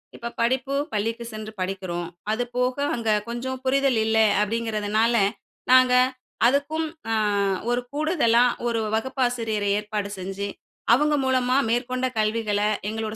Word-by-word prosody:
இப்ப 235 0 -6
படிப்பு 260 +3 0 0.2
பள்ளிக்கு 230 +3 -2
சென்று 215 0 -6
படிக்கிறோம். 185 -2 -3 0.2
அது 235 +3 0
போக 250 +2 0 0.2
அங்க 230 -2 -2 0.2
கொஞ்சம் 255 +2 -4
புரிதல் 270 -3 +2
இல்ல, 220 0 +1 0.2
அப்படிங்கிறதுனால 220 +1 0 0.6
நாங்க 255 -1 +6 0.5
அதுக்கும் 290 +5 0 0.2
அ - - +2 0.6
ஒரு 245 +1 +1
கூடுதலா 290 -7 +3 0.2
ஒரு 230 -1 0 0.2
வகுப்பாசிரியரை 230 -4 -1
ஏற்பாடு 210 -1 -4
செஞ்சு, 195 +2 -4 0.5
அவங்க 295 +3 +3
மூலமா 255 0 +2
மேற்கொண்ட 255 +2 0
கல்விகள 215 -1 0 0.3
எங்களோட 220 0 -4
235 Hz, 120 wpm, -24 LUFS, 215-255 Hz, 0.6 s, நாங்க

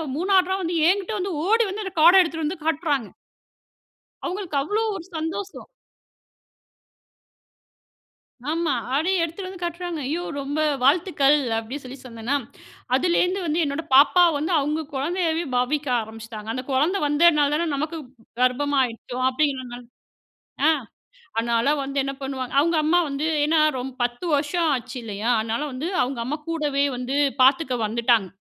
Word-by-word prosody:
3வதா 375 +2 +2
வந்து 345 -1 -2
என்கிட்ட 395 +2 0
வந்து 380 +1 -2 0.2
ஓடி 455 +3 +4
வந்து 415 +3 -4
அந்த 380 - -6
கார்ட 355 +4 +8
எடுத்துட்டு 320 -2 -2
வந்து 315 0 -4
காட்டுறாங்க. 295 - 0 1.2
அவங்களுக்கு 360 -4 -3
அவ்ளோ 425 +7 -1
ஒரு 340 -3 -7
சந்தோஷம். 345 +5 -5 2.8
ஆமா. 320 -1 0 0.2
அப்டியே 350 +4 +1
எடுத்துட்டு 340 +4 -5
வந்து 370 -1 -10
காட்டுறாங்க. 345 -1 -4
ஐயோ! 320 +5 -2 0.2
ரொம்ப 290 +3 -3 0.2
வாழ்த்துக்கள். 295 -1 +4 0.2
அப்படி 225 +5 -5
சொல்லி 255 +1 -9
சொன்னேன்னா, 235 +2 -3 0.6
அதுலேருந்து 360 +5 +1
வந்து 320 +2 0
என்னோட 285 +2 -2
பாப்பாவ 340 +5 +6
வந்து, 315 +5 -2
அவங்க 300 +3 -1
குழந்தையவே 330 +4 -1
பாவிக்க 275 +4 0
ஆரம்பிச்சிட்டாங்க. 220 0 -9
அந்த 255 +1 -4
குழந்த 305 +9 +2
வந்தனால 295 -1 +4
தான 335 +2 0
நமக்கு 305 +4 -3 0.4
கர்ப்பமாயிட்டோ 255 -2 0
அப்டின்ங்கற 265 -1 0
மாரி. 245 0 -9 0.8
ஆ. - - +6 0.7
அதனால 230 +1 +1 0.2
வந்து 275 +1 -5
என்ன 275 0 -3
பண்ணுவாங்க, 265 -2 -4
அவங்க 335 +3 +2
அம்மா 335 +4 +3
வந்து 275 +2 -2 0.2
ஏன்னா 310 +1 +3 0.2
ரொம்ப 260 +1 -5
10 245 +7 -3
வருஷம் 315 +3 0
ஆச்சு 255 0 -4
இல்லையா? 215 +1 -3
அதனால 225 +4 -2
வந்து 265 +6 -4
அவங்க 250 0 -2
அம்மா 290 +6 -3
கூடவே 300 -4 0
வந்து 250 +2 -3 0.3
பாத்துக்க 265 +1 +4
வந்துட்டாங்க. 230 -2 +2
295 Hz, 135 wpm, -23 LUFS, 255-340 Hz, 2.8 s, கார்ட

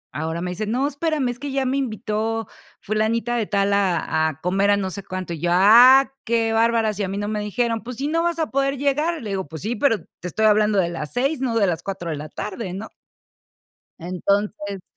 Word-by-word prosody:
Ahora 160 +2 -3
me 180 - -3
dice: 205 +4 -4
"No, 255 +5 0
espérame, 295 -2 -1
es 245 - -9
que 285 0 -5
ya 270 0 0
me 260 +1 0
invitó 225 -2 -2 0.3
fulanita 220 +3 0
de 225 -3 -1
tal 200 0 +1
a 175 -5 +1
a 155 0 -9
comer 195 +3 +1
a 205 - +4
no 190 -2 -2
sé 200 +1 -7
cuánto", 185 -3 -5
y 160 - -6
yo: 175 - 0
"¡Ah, 245 +9 +7
qué 225 -1 +1
bárbaras!, 225 -2 +2
y - - 0
a - - -1
mí 195 +2 -4
no 205 0 -2
me 215 0 -2
dijeron". 225 +2 -1
"Pues 245 0 -7
si 275 +3 -2
no 330 +2 +1
vas 340 -1 0
a 315 - -1
poder 275 0 0
llegar", 300 +4 0
le 210 - -5
digo: 190 -4 -3
"Pues 160 +4 -8
sí, 230 +3 -2
pero 225 0 +2 0.2
te 180 - -6
estoy 220 +5 0
hablando 210 -1 +4
de 175 -3 +2
las 155 -3 -5
6, 270 +3 0
no 245 -3 -1
de 210 - +4
las 165 -2 -1
4 180 -4 -5
de - - -2
la 150 +1 -7
tarde", 195 +2 -5
¿no? 205 +4 -6 1.1
Entonces 200 +2 -2
215 Hz, 235 wpm, -22 LUFS, 190-245 Hz, 1.1 s, Ah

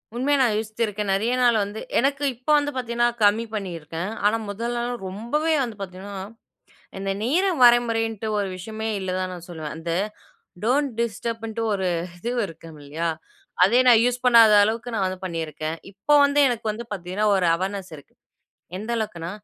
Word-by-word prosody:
உண்மையா 280 +3 +2
நான் 240 -5 +3
யோசிச்சிருக்கேன். 215 -2 -2
நெறைய 220 +5 +1
நாள் 240 -2 +5
வந்து 205 +2 -6 0.2
எனக்கு 275 +3 0
இப்ப 250 +5 -10
வந்து 290 0 0
பார்த்தீங்கன்னா, 240 -1 +1 0.2
கம்மி 210 +3 +4
பண்ணியிருக்கேன். 170 -2 -4
ஆனா, 215 +2 +4
முதலலாம் 240 +3 -3
ரொம்பவே 240 +12 -1
வந்து 230 -4 -5
பார்த்தீங்கன்னா 195 +1 -7 0.8
இந்த 195 0 -2
நேரம் 330 - +1
வரைமுறைன்னுட்டு 230 -2 +3
ஒரு 200 - -1
விஷயமே 220 +4 -5
இல்ல 190 -1 -3
தான் 185 0 -2
நான் 175 -1 -10
சொல்லுவேன். 160 -4 -6
அந்த 165 +1 -4 0.7
டோன்ட் 270 +4 +2
டிஸ்டர்பன்ட்டு 230 0 -3
ஒரு 190 -2 -1 0.3
இது 235 +7 -4 0.2
இருக்கும் 165 -1 -12
இல்லயா? 155 +4 -3 0.6
அதே 225 +7 +5
நான் 235 -2 +8
யூஸ் 245 0 0
பண்ணாத 230 -3 +7
அளவுக்கு 230 +3 -2
நான் 195 -3 +1
வந்து 185 0 -3
பண்ணிருக்கேன். 160 -2 -4 0.2
இப்போ 200 +10 0
வந்து 285 +1 +2
எனக்கு 235 -3 -3
வந்து 220 +3 -6
பார்த்தீங்கன்னா, 190 +1 -2
ஒரு 185 -2 +1
அவேர்னஸ் 190 +1 -4
இருக்கு. 145 - -16 0.6
எந்த 215 +5 -5
அளவுக்குன்னா 175 -7 -4
220 Hz, 155 wpm, -24 LUFS, 185-240 Hz, 0.8 s, நான்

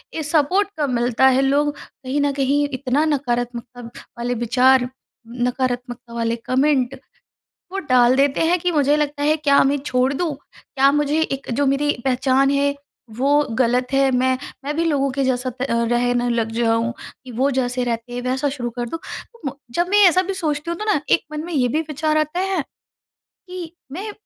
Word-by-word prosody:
ये 315 - -2
सपोर्ट 325 +7 +2
कम 290 -3 0
मिलता 245 +2 +3
है। 265 0 +4
लोग 285 +2 +1
कहीं 270 +2 -5
न 285 0 +2
कहीं 280 +1 +1
इतना 270 +3 0
नकारात्मकता 245 -4 -2 0.4
वाले 240 +1 -2
विचार, 250 +2 +3 0.4
नकारात्मकता 245 0 -3
वाले 230 0 -1
कमेंट 265 -1 +1 0.8
वो 390 - -4
डाल 250 0 +5
देते 275 0 +2
हैं 350 +2 +3
कि 355 +1 0
मुझे 290 -2 +3
लगता 290 -1 -1
है, 305 +1 +3
क्या 280 -2 +4
मैं 280 +1 +2
छोड़ 255 0 +1
दूँ? 315 0 -2 0.4
क्या 275 0 +5
मुझे 295 +2 +1
एक 275 -3 -3
जो 285 +4 +1
मेरी 280 +2 +2
पहचान 265 +1 +2
है, 280 0 +1 0.4
वो 285 +3 +3 0.2
गलत 250 0 +2
है? 275 0 +4
मैं 255 0 +2 0.3
मैं 295 +1 -2
भी 335 - +1
लोगों 280 -4 +1
के 275 +1 -1
जैसा 255 0 0
प - - +1
रहने 240 +1 +1
लग 230 -2 0
जाऊँ 230 0 +1 0.3
कि 250 - -9
वो 260 +5 +1
जैसे 250 -1 -1
रहते 235 0 -3
हैं, 245 - -3
वैसा 260 +3 0
शुरू 255 -3 -4
कर 240 - -1
दूँ। 330 - -5
तो 465 - -10
म - - -1 0.2
जब 345 +1 +1
मैं 415 +1 +5
ऐसा 365 +2 +3
भी 390 +1 -3
सोचती 310 -4 -2
हूँ, 340 - -4
तो 425 - -3
ना - - +1
एक - - +4
मन 305 +1 -4
में 345 - -6
ये 260 -5 +2
भी 305 +6 0
विचार 305 +1 0
आता 310 +3 0
है 380 -2 0 0.9
कि 360 -3 -7 0.2
मैं 410 +7 -5
270 Hz, 190 wpm, -21 LUFS, 245-295 Hz, 0.9 s, डाल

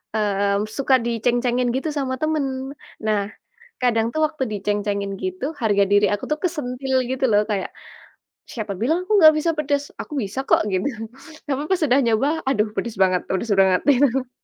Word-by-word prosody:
mmm, 200 0 0
suka 270 -1 +3
diceng-cengin 240 +1 0
gitu 270 +4 -2
sama 260 -2 -1
temen. 310 -2 0 0.6
Nah 210 -2 +2 0.6
kadang 230 -2 +2
tuh 315 - -1
waktu 305 -4 -4
diceng-cengin 205 -1 -2
gitu 185 +6 -3 0.2
harga 205 -3 +3
diri 205 0 +5
aku 205 - -3
tuh 300 - 0
kesentil 265 -5 -2 0.2
gitu 265 0 0
loh, 205 - +5
kayak, 200 -3 -2 0.8
"Siapa 215 -4 -4
bilang 310 +9 +1
aku - - 0
nggak 310 0 +9
bisa 335 - +1
pedes, 285 -1 0 0.2
aku - - -15
bisa 205 +6 -4
kok," - - +5
gitu. 185 +7 0 0.6
Tapi 280 0 -1
pas 380 - +4
sudah 270 -3 +4
nyoba, 230 +5 +2 0.2
"Aduh 215 -5 +1
pedes 235 -3 -3
banget 185 -1 +2
pedes 190 +4 -2
banget." 190 -1 +4
itu. 260 -1 +1
235 Hz, 165 wpm, -22 LUFS, 205-275 Hz, 0.8 s, nggak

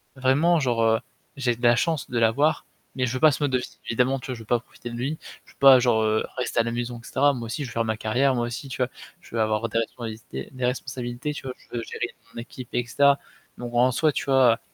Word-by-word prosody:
vraiment 145 +6 +3
genre, 120 -4 +1
heu, 110 0 +3 0.4
j'ai 125 -3 +1
de 120 - -14
la 120 0 +6
chance 160 +3 -1
de 120 - -2
l'avoir, 115 +8 +2 0.3
mais 130 -1 +1
je 120 - -2
veux 130 - -2
pas 155 -1 +6
ce 145 - -2
mode 140 - +1
de 130 - +3
vie. 125 - -7
Évidemment, 125 +3 +1
tu - - -10
vois, 130 - -3
je - - -11
veux 110 - -11
pas 120 +2 +2
profiter 120 - -10
de 120 - -7
lui. 135 +6 -2 0.3
Je - - -20
veux - - -26
pas 135 -2 +9
genre, 120 -3 +3
heu, 110 0 +2
rester 125 -1 -1
à - - 0
la 115 - -2
maison, 120 0 -4
et 120 - -15
cetera, 145 +1 +3
moi 120 -3 -5
aussi, 125 +6 -3
je - - -7
veux - - -10
faire 115 - +1
ma 110 -1 -2
carrière, 130 +5 +1
moi 120 0 0
aussi, 130 +3 -6
tu - - -5
vois. 125 - +3 0.3
Je - - -12
veux 115 - +1
avoir 110 +1 +1
des 115 +1 0
responsabilités 110 - -6
des 130 -1 -2
responsabilités, 125 +2 -3
tu - - -8
vois, 130 -1 -5
je - - -23
veux 115 - -2
gérer 120 - -3 0.3
mon - - -7
équipe, 125 0 -10
et 120 0 0
cetera. 140 +3 +4 0.4
Donc 120 0 -7
en 125 +2 +4
soi, 155 +5 +2
tu - - -2
vois, 130 -4 +4
125 Hz, 280 wpm, -25 LUFS, 115-135 Hz, 0.4 s, pas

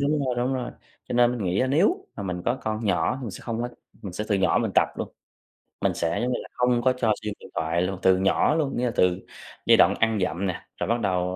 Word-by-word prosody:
đúng 145 +2 +1
rồi, 125 -1 0
đúng 125 +2 0
rồi. 125 -2 -3 0.4
Cho - - -4
nên 120 0 +4
mình 120 -5 -3
nghĩ 90 +2 +1
á 130 - +2
nếu 200 - +2
mà 100 - -5
mình 90 -2 -4
có 120 +2 0
con 110 +1 -2
nhỏ, 100 +6 +1
mình 115 - -4
sẽ - - -9
không 115 0 -3
có 120 - -2 0.3
mình 95 -3 -6
sẽ 105 +4 -3
từ 100 - +2
nhỏ 95 -1 +3
mình - - -1
tập - - +4
luôn. - - -4 0.7
Mình - - +2
sẽ, 85 0 -1
giống 125 +1 0
như - - -1
là, - - -10
không 125 -1 +2
có 130 +1 +3
cho 115 -4 +2
xem 105 -1 -3
điện - - -13
thoại 80 +2 0
luôn, 95 0 -2
từ 95 -1 +5
nhỏ 95 +10 +2
luôn, 150 -4 -1
nghĩa 125 - 0
là 120 - 0
từ 90 0 +3 0.5
giai - - +6
đoạn - - +5
ăn 110 -2 +2
dặm 95 +1 -1
nè, 90 - -4
rồi - - -2
bắt 120 +1 +2
đầu 90 -1 0
110 Hz, 275 wpm, -25 LUFS, 95-125 Hz, 0.7 s, giai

